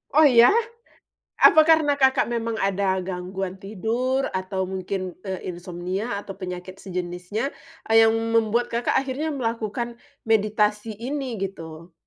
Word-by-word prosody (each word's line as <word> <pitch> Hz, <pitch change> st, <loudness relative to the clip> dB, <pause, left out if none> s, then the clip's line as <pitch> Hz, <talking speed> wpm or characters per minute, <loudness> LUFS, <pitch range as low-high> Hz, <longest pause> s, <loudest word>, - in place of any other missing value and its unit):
Oh, 310 Hz, -, +7 dB
ya? 245 Hz, -5 st, +7 dB, 0.9 s
Apa 315 Hz, -, +8 dB
karena 315 Hz, -3 st, +4 dB
Kakak 265 Hz, -1 st, +3 dB
memang 230 Hz, -1 st, -2 dB
ada 195 Hz, -1 st, +1 dB
gangguan 185 Hz, +1 st, -4 dB
tidur 225 Hz, +7 st, -1 dB
atau 190 Hz, 0 st, -2 dB
mungkin 185 Hz, -1 st, -4 dB
e 190 Hz, -2 st, -5 dB
insomnia 180 Hz, +4 st, -4 dB
atau 195 Hz, -1 st, -9 dB
penyakit 180 Hz, 0 st, -7 dB
sejenisnya 180 Hz, +5 st, -4 dB, 0.4 s
yang 225 Hz, 0 st, +6 dB
membuat 225 Hz, +1 st, +1 dB
Kakak 235 Hz, +1 st, -1 dB
akhirnya 275 Hz, +4 st, -2 dB
melakukan 235 Hz, -2 st, -3 dB, 0.3 s
meditasi 215 Hz, 0 st, +1 dB
ini, 260 Hz, -2 st, -3 dB
gitu? 170 Hz, -3 st, -7 dB
210 Hz, 120 wpm, -24 LUFS, 185-235 Hz, 0.9 s, Apa